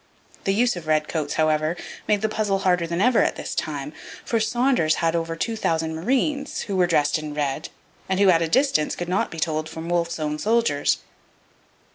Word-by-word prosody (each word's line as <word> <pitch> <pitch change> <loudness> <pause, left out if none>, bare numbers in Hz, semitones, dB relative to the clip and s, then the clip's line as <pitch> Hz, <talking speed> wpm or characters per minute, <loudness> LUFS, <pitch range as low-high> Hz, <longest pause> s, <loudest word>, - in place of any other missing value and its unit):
The 195 - +2
use 240 +1 +2
of 170 -3 -8
redcoats, 155 -1 0
however, 155 +1 +1 0.3
made 210 0 +2
the - - +3
puzzle 210 -2 0
harder 180 -3 +1
than 170 +2 -1
ever 250 +2 +4
at - - +1
this - - -5
time, 145 -1 -3 0.3
for 230 - +1
Saunders 230 - +2
had 165 0 0
over 165 0 -2
2,000 165 -5 -1
marines, 270 - -1
who 200 - -4
were 180 -1 +3
dressed 150 -1 +2
in 150 -1 -6
red 145 0 -2 0.4
and 190 0 +1
who 200 -2 +6
at 165 -1 +3
a 165 - +1
distance 255 - +2
could 175 - -4
not 185 +2 0
be 165 - -7
told 155 -1 -1
from 160 +1 -7
Wolfe's 170 -1 0
own 150 0 -2
soldiers. 220 -8 +2
170 Hz, 190 wpm, -23 LUFS, 155-215 Hz, 0.4 s, who